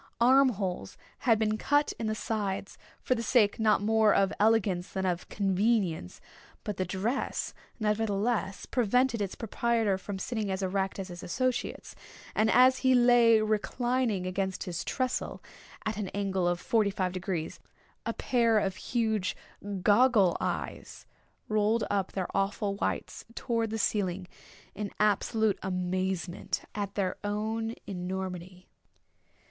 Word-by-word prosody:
Arm 260 +3 +6
holes 190 -5 -4 0.3
had 225 - +6
been 215 0 0
cut 290 +1 +2
in 225 - -2
the 215 - -1
sides, 200 -3 -3 0.3
for - - +2
the 235 - -2
sake 225 -3 +3
not 215 -2 +3
more 220 0 +4
of 195 0 +2
elegance 205 -4 +2
than 190 -1 -2
of 180 -1 -2
convenience; 195 - 0 0.4
but 205 -2 -4
the 185 - 0
dress, 200 +9 -2 0.3
nevertheless, 210 -1 0
prevented 250 0 +1
its 195 -2 -3
proprietor 225 -3 0
from 195 +1 -5
sitting 215 +1 -3
as 190 0 -2
erect 190 0 -1
as 195 -1 -5
his 175 0 -8
associates; 255 +8 -2 0.4
and 220 +1 +2
as 255 +2 +6
he 260 -1 +4
lay 240 -2 +6
reclining 220 -1 0
against 190 0 -2
his 170 -2 -4
tressel, 255 -1 -2 0.5
at 215 -1 -2
an 210 -2 -2
angle 190 -3 0
of 175 0 0
forty 215 0 +2
five 190 -2 -1
degrees, 180 -3 -4 0.4
a - - -1
pair 230 -3 +2
of 195 -2 0
huge 220 -5 -1 0.5
goggle 210 -4 +5
eyes - - -4 0.4
rolled 215 +1 +2
up 195 -2 0
their 185 -2 -3
awful 195 +1 0
whites 200 - -3
towards 230 -2 -1
the 225 - -3
ceiling 190 -4 -1 0.5
in 210 -1 -4
absolute 210 +1 +2
amazement 185 -1 -2
at 200 -1 -4
their 190 -3 -1
own 220 +2 -2
enormity. 185 -1 -5
205 Hz, 140 wpm, -29 LUFS, 190-225 Hz, 0.5 s, Arm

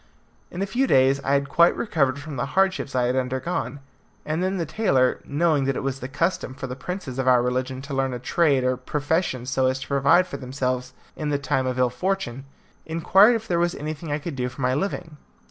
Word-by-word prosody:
In 180 +2 -3
a - - +1
few 250 +7 0
days 135 - +4
I 140 - +1
had 140 0 +2
quite 170 +5 +4
recovered 140 - +1
from 145 0 -7
the 125 +2 -2
hardships 190 -8 +1
I 125 - +2
had 125 +1 +1
undergone, 130 +1 -2 0.4
and 155 +3 -1
then 190 +1 0
the 170 - -1
tailor, 135 - +1
knowing 150 -1 +1
that 135 -1 0
it - - -3
was 135 0 -2
the 125 - -5
custom 145 -1 -1
for 135 - -6
the 125 -1 -5
princes 140 -3 -6
of 130 - -1
our 125 -1 +5
religion 130 +1 -2
to 140 0 -7
learn 135 -1 0
a 125 - -3
trade 140 +1 +2
or 130 0 +1
profession 145 0 -1
so 130 0 +1
as 130 0 0
to - - -7
provide 140 +6 +4
for 140 - -7
themselves 130 -1 -3 0.2
in 150 -1 -3
times 130 -2 0
of 130 - -3
ill 125 -1 +2
fortune, 135 -3 -2 0.4
inquired 190 +8 +4
if 225 0 -4
there 170 -4 +1
was 175 0 +1
anything 155 +1 -5
I 145 - +1
could 155 0 -6
do 125 -1 -2
for 130 - -10
my 125 0 +2
living. 165 0 -3
140 Hz, 225 wpm, -24 LUFS, 130-170 Hz, 0.4 s, our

